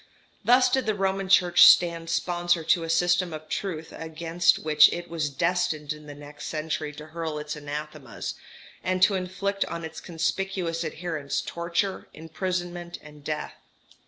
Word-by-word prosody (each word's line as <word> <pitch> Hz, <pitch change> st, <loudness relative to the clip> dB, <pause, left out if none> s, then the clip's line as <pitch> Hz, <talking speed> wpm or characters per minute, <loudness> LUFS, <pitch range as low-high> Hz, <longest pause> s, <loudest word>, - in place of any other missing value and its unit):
Thus 250 Hz, +1 st, +5 dB
did 260 Hz, -1 st, 0 dB
the 215 Hz, -, +1 dB
Roman 195 Hz, -1 st, -1 dB
Church 175 Hz, -2 st, +6 dB
stand 170 Hz, -1 st, +6 dB
sponsor 175 Hz, 0 st, +1 dB
to 170 Hz, +2 st, +3 dB
a 165 Hz, -, -5 dB
system 175 Hz, +1 st, +2 dB
of 155 Hz, 0 st, -8 dB
truth 165 Hz, -5 st, -4 dB
against 165 Hz, +2 st, +1 dB
which 150 Hz, -1 st, +6 dB
it 175 Hz, 0 st, -5 dB
was 160 Hz, -3 st, -1 dB
destined 160 Hz, 0 st, 0 dB
in 150 Hz, 0 st, -13 dB
the 145 Hz, -, -9 dB
next 145 Hz, 0 st, -9 dB
century 155 Hz, -1 st, -3 dB
to 150 Hz, +1 st, -10 dB
hurl 160 Hz, -1 st, -4 dB
its 150 Hz, +1 st, -5 dB
anathemas, 150 Hz, -2 st, -6 dB, 0.5 s
and 185 Hz, 0 st, +1 dB
to 205 Hz, -, +6 dB
inflict 195 Hz, +2 st, -1 dB
on 170 Hz, -1 st, -5 dB
its 160 Hz, 0 st, -8 dB
conspicuous 175 Hz, 0 st, -2 dB
adherents 155 Hz, -3 st, -3 dB
torture, 170 Hz, +3 st, -2 dB
imprisonment, 175 Hz, +1 st, -4 dB
and 150 Hz, -1 st, -14 dB
death. 150 Hz, 0 st, -4 dB
170 Hz, 155 wpm, -26 LUFS, 155-180 Hz, 0.5 s, Church